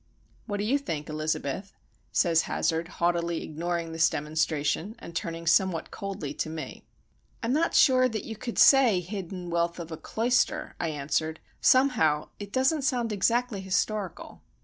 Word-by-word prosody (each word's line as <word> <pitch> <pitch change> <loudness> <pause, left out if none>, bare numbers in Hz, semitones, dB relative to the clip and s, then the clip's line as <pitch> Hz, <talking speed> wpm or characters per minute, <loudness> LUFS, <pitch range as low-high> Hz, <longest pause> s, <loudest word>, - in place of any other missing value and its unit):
"What 205 - -2
do 205 - -2
you 260 +7 +2
think, 155 - -5
Elizabeth?" 155 +4 -3 0.4
says 165 -2 +3
Hazard, 165 0 0
haughtily 170 -1 0
ignoring 170 +1 -3
this 165 0 +3
demonstration, 155 +5 -1
and 170 - -11
turning 165 -2 -4
somewhat 175 0 +2
coldly 190 -8 -5
to 155 - -3
me. 160 -1 -7 0.6
"I'm 230 +2 +1
not 325 +3 +1
sure 255 -2 +5
that 220 -3 -4
you 225 - -6
could 235 +2 -6
say 255 -9 +6
hidden 180 -1 -6
wealth 170 0 0
of 170 -1 -7
a 160 - -5
'cloister,'" 245 +7 0
I 170 - -1
answered. 155 +1 -2 0.2
"Somehow 225 - +3
it 200 -1 -7
doesn't 265 +5 +2
sound 250 -5 0
exactly 230 +1 +1
historical." 190 0 -2
175 Hz, 150 wpm, -27 LUFS, 160-225 Hz, 0.6 s, say